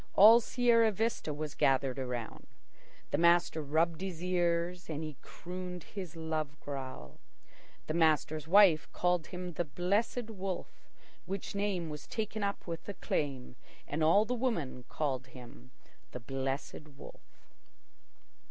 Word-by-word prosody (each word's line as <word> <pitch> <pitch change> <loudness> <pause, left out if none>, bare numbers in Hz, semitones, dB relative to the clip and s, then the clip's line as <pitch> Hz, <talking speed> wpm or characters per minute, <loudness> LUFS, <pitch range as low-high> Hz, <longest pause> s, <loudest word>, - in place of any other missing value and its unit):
All 220 +4 +9
Sierra 235 -2 +3
Vista 220 -5 -1
was 150 0 -4
gathered 135 0 +2
around. 125 -3 -5 0.6
The 145 - +1
master 170 -1 +4
rubbed 160 +3 +1
his 180 -3 -5
ears, 175 0 0
and 155 0 -3
he 155 -2 -6
crooned 180 -1 -7
his 185 -5 -7
love 155 -2 -3
growl. 130 - -7 0.7
The 155 - -3
master's 155 -2 +2
wife 180 -4 +6
called 180 -2 +1
him 180 -1 -6
the 175 - 0
"Blessed 205 - -1
Wolf," 195 -3 -6 0.4
which 195 0 -4
name 200 -4 -1
was 150 -1 -8
taken 215 -1 -3
up 200 0 -2
with 170 +2 -6
acclaim 135 -9 -3 0.3
and 155 +2 -1
all 185 +7 +5
the 245 - -1
women 215 - -2
called 135 -4 -2
him 120 - -13 0.4
the 125 - -5
Blessed 135 +4 -4
Wolf. - - -15
165 Hz, 135 wpm, -32 LUFS, 145-190 Hz, 0.7 s, All